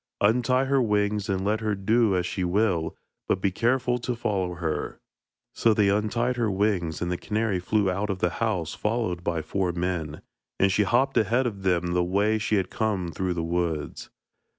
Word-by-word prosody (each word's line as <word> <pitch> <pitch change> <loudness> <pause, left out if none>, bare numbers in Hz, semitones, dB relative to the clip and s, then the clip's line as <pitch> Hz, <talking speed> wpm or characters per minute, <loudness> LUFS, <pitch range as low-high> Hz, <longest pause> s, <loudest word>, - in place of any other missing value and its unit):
Untie 125 +5 +3
her 135 0 +2
wings 105 -1 0
and 95 0 -1
let 105 +2 +1
her 110 -2 -1
do 110 +1 +2
as 90 -1 0
she 95 +1 -2
will, 90 -3 0 0.3
but - - +1
be 95 0 +1
careful 125 +4 +1
to 125 +1 -3
follow 95 -6 -1
her.' 85 -2 -3 0.5
So 115 -2 +3
they 105 -2 +3
untied 115 +5 0
her 115 -3 +1
wings, 95 -5 0
and 90 - -2
the 90 - -2
canary 105 -3 -1
flew 100 +3 +1
out 100 +3 -1
of 95 - -1
the 90 -2 0
house 95 -8 -1
followed 105 -6 -2
by 85 -2 -1
four 95 0 -1
men, 85 -4 -3 0.4
and 95 0 +4
she 105 +1 +2
hopped 130 +6 +2
ahead 115 +5 +2
of 105 -5 -3
them 90 -2 +1
the 90 0 +2
way 100 +5 +1
she 105 0 0
had 95 -3 0
come 100 -6 -1
through 90 +2 -2
the 85 - -2
woods. 85 -3 -2
100 Hz, 195 wpm, -26 LUFS, 90-110 Hz, 0.5 s, and